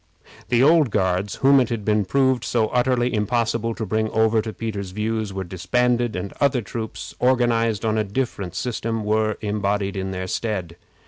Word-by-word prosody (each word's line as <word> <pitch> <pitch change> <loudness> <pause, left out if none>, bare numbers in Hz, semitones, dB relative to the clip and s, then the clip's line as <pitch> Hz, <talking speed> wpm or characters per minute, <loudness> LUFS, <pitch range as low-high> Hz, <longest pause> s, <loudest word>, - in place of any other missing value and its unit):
The 120 +1 +4
old 155 -2 +5
Guards, 95 -1 0
whom 140 0 +7
it 125 - +1
had 115 -4 -3
been 105 -1 +2
proved 130 +1 +2
so 110 -3 +1
utterly 125 0 +1
impossible 115 +1 0
to 110 - -4
bring 110 +2 0
over 110 0 +2
to 110 0 -5
Peter's 100 -2 -5
views, 110 +1 -2
were 95 0 -4
disbanded, 120 +7 0
and 90 +2 -4
other 135 -4 +2
troops, 110 +2 -6
organized 115 -4 +2
on 110 0 +1
a - - +2
different 100 -4 -3
system, 115 +2 -2
were 110 0 +1
embodied 100 -1 -1
in 95 0 -3
their 95 -1 -4
stead. 95 -4 -3
110 Hz, 175 wpm, -22 LUFS, 100-120 Hz, -, whom